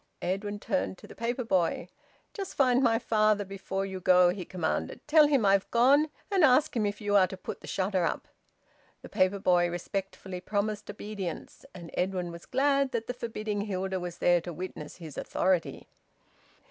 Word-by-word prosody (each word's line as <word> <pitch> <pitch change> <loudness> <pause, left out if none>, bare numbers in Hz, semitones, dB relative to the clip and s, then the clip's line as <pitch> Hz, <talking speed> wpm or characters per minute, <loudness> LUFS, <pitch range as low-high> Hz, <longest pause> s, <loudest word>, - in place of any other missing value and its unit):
Edwin 205 +3 -2
turned 95 - -2
to - - -14
the - - -11
paper 240 +2 -2
boy. 180 -5 0 0.5
"Just 395 -4 -6
find 255 -2 +4
my 230 -3 +3
father 215 -3 +2
before 195 0 -4
you 190 -1 -5
go," 180 -1 +5
he 180 +1 -3
commanded. 180 -3 -2
"Tell 305 0 +6
him 275 -7 +2
I've 195 0 +3
gone, 275 +6 +4 0.2
and 385 -4 +3
ask 270 0 +4
him 215 -3 +1
if 205 - -4
you 205 -1 0
are 190 -2 +6
to 190 - -8
put - - -7
the - - -11
shutter 190 -1 0
up." - - -2 0.8
The - - -10
paper 185 +2 +2
boy 175 -2 +3
respectfully 185 +1 -5
promised 210 +2 -2
obedience. 205 0 -6
And 170 -2 -9
Edwin 180 -1 -1
was 170 0 -11
glad 275 0 +2
that 230 -1 -1
the 250 - -3
forbidding 215 -4 -4
Hilda 190 -2 -2
was 175 -1 -6
there 175 -1 +3
to 175 - -6
witness 170 -3 -7
his 160 -5 -8
authority. 185 -2 -1
195 Hz, 180 wpm, -29 LUFS, 180-230 Hz, 0.8 s, Tell